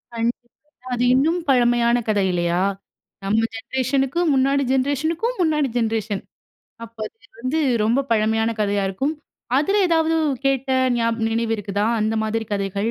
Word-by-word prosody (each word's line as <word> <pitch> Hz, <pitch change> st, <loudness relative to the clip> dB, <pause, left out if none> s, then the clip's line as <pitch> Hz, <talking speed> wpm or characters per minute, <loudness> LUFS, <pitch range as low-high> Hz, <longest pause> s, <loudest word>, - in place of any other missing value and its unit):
கண்டிப்பா. 235 Hz, +1 st, -2 dB, 0.4 s
அது 245 Hz, 0 st, 0 dB
இன்னும் 315 Hz, +7 st, +2 dB
பழமையான 240 Hz, -2 st, +3 dB
கதை, 205 Hz, -2 st, +2 dB
இல்லையா, 175 Hz, 0 st, 0 dB, 0.6 s
நம்ம 215 Hz, +3 st, +2 dB
ஜென்ரேஷனுக்கும் 270 Hz, +7 st, 0 dB
முன்னாடி 275 Hz, +1 st, +2 dB
ஜென்ரேஷனுக்கும் 315 Hz, -, 0 dB
முன்னாடி 300 Hz, -4 st, +2 dB
ஜென்ரேஷன். 220 Hz, -3 st, -1 dB, 0.6 s
அப்ப 230 Hz, 0 st, -15 dB
அது 225 Hz, 0 st, -26 dB
வந்து 260 Hz, +6 st, -1 dB, 0.2 s
ரொம்ப 240 Hz, +6 st, +2 dB
பழமையான 220 Hz, 0 st, +2 dB
கதையா 205 Hz, -1 st, +1 dB
இருக்கும். 265 Hz, +11 st, -2 dB, 0.4 s
அதில 390 Hz, +8 st, +2 dB
ஏதாவது 325 Hz, -1 st, +2 dB, 0.3 s
கேட்ட 270 Hz, 0 st, 0 dB, 0.3 s
நியாப் 230 Hz, -1 st, 0 dB
நினைவு 225 Hz, 0 st, -1 dB
இருக்குதா, 205 Hz, 0 st, -2 dB
அந்த 215 Hz, +1 st, 0 dB
மாதிரி 225 Hz, +1 st, -2 dB
கதைகள், 200 Hz, +2 st, -1 dB
235 Hz, 130 wpm, -21 LUFS, 220-275 Hz, 0.6 s, பழமையான